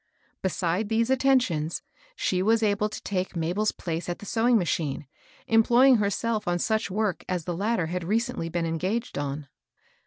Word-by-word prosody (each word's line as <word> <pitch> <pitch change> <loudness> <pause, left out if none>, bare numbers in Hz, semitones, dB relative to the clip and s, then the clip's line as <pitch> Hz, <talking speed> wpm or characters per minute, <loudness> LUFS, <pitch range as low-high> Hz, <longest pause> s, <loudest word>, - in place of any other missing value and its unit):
Beside 185 +2 -1
these 230 +2 +1
attentions, 250 - +2 0.3
she 185 - 0
was 225 +3 +3
able 210 0 +1
to - - -8
take 185 -1 -2
Mabel's 175 +6 0
place 170 0 -4
at 175 - -2
the - - -11
sewing 235 +2 +3
machine, 155 -6 -1 0.4
employing 240 +3 +5
herself 210 +1 -1
on 175 0 +1
such 220 +1 0
work 205 -1 -1
as 180 -4 -2
the 175 - -2
latter 205 0 0
had 175 +2 -3
recently 220 -1 -1
been 170 0 -1
engaged 185 +9 -2
on. 145 0 -4
200 Hz, 160 wpm, -26 LUFS, 170-225 Hz, 0.4 s, employing